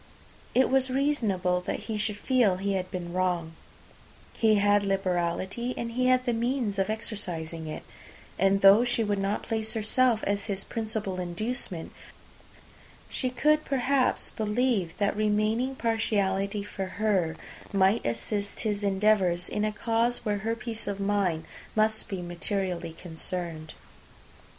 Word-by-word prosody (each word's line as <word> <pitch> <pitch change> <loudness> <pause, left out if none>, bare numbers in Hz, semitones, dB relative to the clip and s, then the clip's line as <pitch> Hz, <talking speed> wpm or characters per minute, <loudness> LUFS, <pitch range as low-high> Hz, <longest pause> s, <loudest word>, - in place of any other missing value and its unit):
It 260 +1 +4
was 265 -1 +3
reasonable 215 -10 +1
that - - -3
he 220 - -4
should 210 -1 -1
feel 230 -5 +3
he 200 +1 -1
had 185 -1 -2
been 175 -1 -5
wrong; 180 -3 0 0.8
he 220 -1 +3
had 205 0 +4
liberality, 195 +4 -1
and 235 0 -3
he 255 +2 +1
had 255 0 +3
the 240 - +1
means 230 -3 -1
of 195 +1 +1
exercising 170 -7 -4
it; 155 - -6 0.6
and 195 +1 +3
though 200 +4 +8
she 245 -2 +1
would 205 -2 0
not 195 +2 -1
place 220 -1 -2
herself 225 +1 +2
as 200 0 -1
his 195 -1 -2
principal 215 -4 -3
inducement, 180 0 -3 1.2
she 255 - -1
could 300 +5 +2
perhaps 270 0 +1
believe, 215 -5 0
that 200 -1 +1
remaining 215 +5 +1
partiality 205 -4 0
for 195 -1 -5
her 190 -7 +1 0.4
might 195 +3 +3
assist 200 - -2
his 210 -2 -1
endeavours 195 -3 +2
in 210 - -2
a 215 - +1
cause 230 +3 0
where 205 -1 0
her 225 +3 -1
peace 230 -1 -5
of 200 -1 -3
mind 195 -5 0 0.3
must 220 +1 +2
be 190 -4 -4
materially 175 -1 -1
concerned. 165 -1 -5
205 Hz, 140 wpm, -28 LUFS, 185-230 Hz, 1.2 s, though